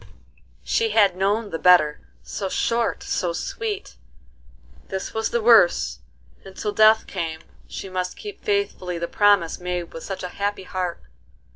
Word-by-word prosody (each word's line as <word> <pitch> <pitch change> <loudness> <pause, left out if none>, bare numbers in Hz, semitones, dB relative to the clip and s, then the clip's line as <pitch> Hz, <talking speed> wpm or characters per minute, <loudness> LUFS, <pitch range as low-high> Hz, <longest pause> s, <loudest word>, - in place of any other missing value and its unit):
She 455 -1 +1
had 200 - +4
known 205 +3 0
the 165 - -3
better, 155 -5 +5 0.2
so 195 -2 -4
short, 230 +4 0
so - - -1
sweet! 430 -5 -5 0.9
This 190 0 -5
was 220 0 -1
the 235 -2 -1
worse, 225 -6 +5 0.4
and 190 -1 -12
till 210 - -2
death 220 +1 +5
came 165 -4 -4 0.3
she - - -7
must 185 -1 -3
keep 410 -1 -9
faithfully 400 - -1
the 170 0 -3
promise 205 -5 +3
made 180 -1 -4
with 165 - -8
such 195 -1 -6
a 180 - -4
happy 205 -1 -1
heart. 180 -2 -4
195 Hz, 150 wpm, -23 LUFS, 180-225 Hz, 0.9 s, better